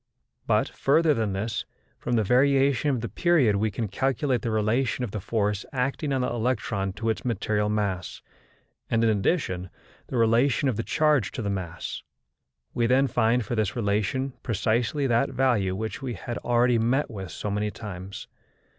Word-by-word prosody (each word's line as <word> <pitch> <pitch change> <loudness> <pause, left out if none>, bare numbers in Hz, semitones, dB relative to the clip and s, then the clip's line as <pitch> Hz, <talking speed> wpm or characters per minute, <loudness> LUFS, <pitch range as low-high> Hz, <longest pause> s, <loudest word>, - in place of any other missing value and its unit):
But, - - +3
further 155 +3 +2
than 110 -6 -1
this, 105 +3 -2 0.4
from 120 - -1
the 110 - +3
variation 135 +4 +3
of 130 -5 0
the 115 - -3
period 125 - +3
we 110 +2 +1
can 110 +2 -3
calculate 130 +3 0
the 120 - -2
relation 110 +4 0
of 115 - -3
the 105 - -3
force 105 0 -1
acting 135 +3 -1
on 135 -1 +1
the 125 - 0
electron 110 -4 -1
to 115 +3 -2
its 110 - -5
material 105 -3 0
mass, 100 -4 -2 0.7
and, 115 0 +2
in 115 - +4
addition, 95 - -1 0.4
the 130 - -3
relation 115 +4 +3
of 130 - +1
the 115 - -1
charge 150 - +2
to 120 - -4
the 100 - -1
mass. 90 -4 -5 0.7
We 115 -1 +1
then 130 +3 +4
find 120 -2 +1
for - - -4
this 110 -2 0
relation 110 +4 0
precisely 115 +5 0
that 120 +2 +2
value 120 -8 +1
which 110 +4 -4
we 125 -4 -4
have 120 +5 -5
already 120 0 +2
met 125 +6 +1
with 95 -4 -6
so 105 - -4
many 105 +1 0
times. 100 -3 -8
115 Hz, 175 wpm, -26 LUFS, 105-130 Hz, 0.7 s, in